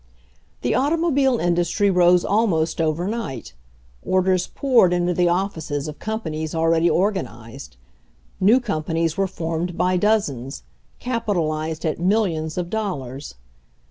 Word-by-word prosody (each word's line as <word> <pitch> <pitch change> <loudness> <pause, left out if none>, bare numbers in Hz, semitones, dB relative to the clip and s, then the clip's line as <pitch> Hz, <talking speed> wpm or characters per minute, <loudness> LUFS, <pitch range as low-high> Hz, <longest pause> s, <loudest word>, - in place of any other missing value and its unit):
The 120 - +1
automobile 280 -3 +2
industry 175 +3 +1
rose 180 -1 +4
almost 170 -7 +1
over 160 +3 0
night. 205 - -5 0.5
Orders 185 -1 +1
poured 245 -10 +3
into 175 0 +1
the 175 0 +2
offices 160 -6 -2
of 150 -1 -8
com 220 +1 -3
panies 155 -3 -4
already 165 +1 +3
organized; 130 - -3 0.6
new 215 +7 +5
companies 165 -6 -1
were 195 0 +1
formed 170 -1 -4
by 180 0 +2
dozens, 150 - 0 0.3
capitalized 160 -10 -2
at 155 - -1
millions 175 -5 0
of 175 0 -3
dol 210 -6 -1
lars. 135 +2 -8
175 Hz, 125 wpm, -22 LUFS, 160-205 Hz, 0.6 s, new